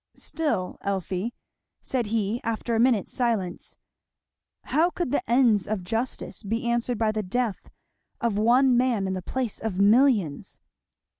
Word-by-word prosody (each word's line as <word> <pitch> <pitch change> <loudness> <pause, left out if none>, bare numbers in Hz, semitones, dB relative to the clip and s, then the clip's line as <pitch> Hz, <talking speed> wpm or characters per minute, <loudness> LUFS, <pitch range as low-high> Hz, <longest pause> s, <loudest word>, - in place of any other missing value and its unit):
"Still, 290 - -2
Elfie," 195 +2 -2 0.5
said 245 -4 -2
he 220 +1 -1
after 230 +1 -2
a 225 - +2
minute's 235 -5 +2
silence, 225 -8 -2 0.9
"how 330 +4 +2
could 350 -7 -3
the - - +1
ends 235 -6 +3
of 210 -3 -2
justice 225 +7 -3
be 225 +3 -3
answered 235 0 0
by 220 0 +1
the 215 0 -2
death 215 +2 -2 0.5
of 235 -3 0
one 245 +4 +4
man 240 -5 +2
in 190 - -2
the 185 - -3
place 250 +3 -3
of 220 -4 -3
millions?" 205 - +3
225 Hz, 145 wpm, -26 LUFS, 200-245 Hz, 0.9 s, one